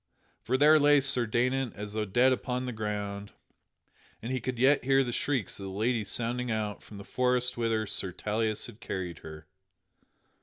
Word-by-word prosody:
For 130 +2 0
there 155 +3 +6
lay 145 0 +5
Sir 130 -3 +2
Daynant 125 +3 0
as 105 0 -7
though 110 0 -1
dead 120 +6 +3
upon 125 0 -3
the 125 - -3
ground, 105 -2 -4 0.9
and 115 - -6
he 130 -1 -1
could 130 -1 -3
yet 135 +4 +4
hear 135 +1 +3
the 120 - -3
shrieks 125 -9 -1
of 100 - -6
the 95 - -6
lady 110 +3 0
sounding 120 +4 -1
out 110 -2 -2
from 105 - -12
the 100 - -8
forest 125 +2 0
whither 115 -2 0
Sir 95 -2 -3
Tauleas 110 +3 -2
had 120 -3 -11
carried 90 -6 -5
her. 80 0 -10
115 Hz, 185 wpm, -29 LUFS, 105-125 Hz, 0.9 s, there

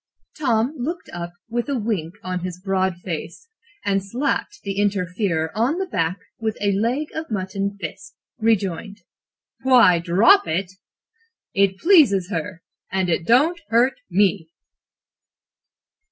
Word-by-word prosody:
"Tom 245 -2 +1
looked 330 +8 -4
up 175 0 -5 0.2
with 240 +4 -2
a 275 - 0
wink 205 -7 -2
on 185 0 -2
his 180 0 -6
broad 190 -1 0
face, 170 - -6 0.4
and, 195 -1 +1
slapping 240 +9 -1 0.2
the 195 0 -3
interferer 180 -4 -1
on 245 +9 +1
the 380 - -1
back 170 - -1 0.2
with 220 -2 -2
a 205 -1 +1
leg 235 +10 0
of 320 0 -5
mutton 200 -1 -3
fist, 160 -5 -7 0.2
rejoined: 205 -2 0 0.6
"'Why, 245 -10 +6
drop 195 - +5
it! 180 +3 -1 0.8
It 195 -1 +2
pleases 215 - +4
her 195 -4 -4 0.3
and 190 -2 0
it 165 0 -1
don't 310 +9 +4
hurt 240 +4 +3
me!'" 190 -3 +2
200 Hz, 130 wpm, -22 LUFS, 185-240 Hz, 0.8 s, Why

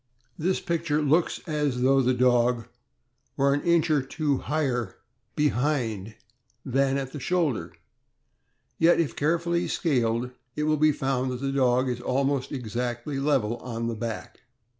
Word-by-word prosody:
This 185 +4 0
picture 160 -3 -1
looks 155 +3 +2
as 150 -6 -1
though 135 +1 +4
the 130 0 +2
dog 125 -2 +3 0.7
were 140 0 +3
an 145 - 0
inch 170 -1 +2
or 150 -2 +3
two 145 0 -1
higher 130 -8 -1 0.4
behind 125 -7 0 0.5
than 135 +1 +1
at 135 -1 -4
the 150 - -6
shoulder, 145 - 0 1.1
yet, 170 +1 +5
if 165 -4 0
carefully 170 +3 0
scaled, 125 -6 0 0.2
it 150 - -1
will 155 0 +2
be 155 +1 +4
found 135 -2 -1
that 125 - -4
the 135 +1 -2
dog 130 -1 +2
is 125 -1 -2
almost 135 +1 0
exactly 125 +2 -3
level 135 -6 +1
on 115 -1 -5
the 115 0 -2
back. 115 0 -6
135 Hz, 145 wpm, -26 LUFS, 125-150 Hz, 1.1 s, yet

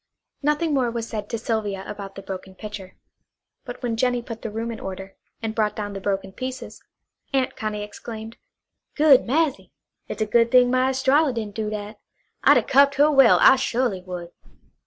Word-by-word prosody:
Nothing 300 +2 +1
more 260 -4 +2
was 230 -1 -4
said 210 -2 -5
to 230 - -2
Sylvia 215 -4 -2
about 200 -1 -8
the 195 - -9
broken 190 0 -8
pitcher; 205 -2 -9 0.7
but - - -9
when 235 -2 -1
Jennie 245 +1 0
put 230 -2 -8
the 225 - -4
room 225 +2 -4
in 225 - -7
order, 195 0 -7 0.3
and 220 -1 -2
brought 215 -2 0
down 205 -1 -4
the 195 - -6
broken 195 -1 -2
pieces, 255 -1 -7 0.5
Aunt 265 -2 0
Connie 210 -1 -4
exclaimed: 220 +2 -9 0.6
"Good 290 -5 +5
massy! 295 +2 0 0.3
It's - - -6
a 215 - +1
good 230 +2 +3
thing 250 0 +5
my 255 +1 +2
Estralla 265 +2 +2
didn't 215 -3 -4
do 215 0 -3
that! 210 0 -6 0.4
I'd - - +7
'a' - - +2
cuffed 280 +1 +4
her 295 +2 +4
well, 275 -2 +6
I 270 - +7
su'ly 240 -6 -1
would." 180 -2 -7
225 Hz, 185 wpm, -23 LUFS, 205-260 Hz, 0.7 s, I'd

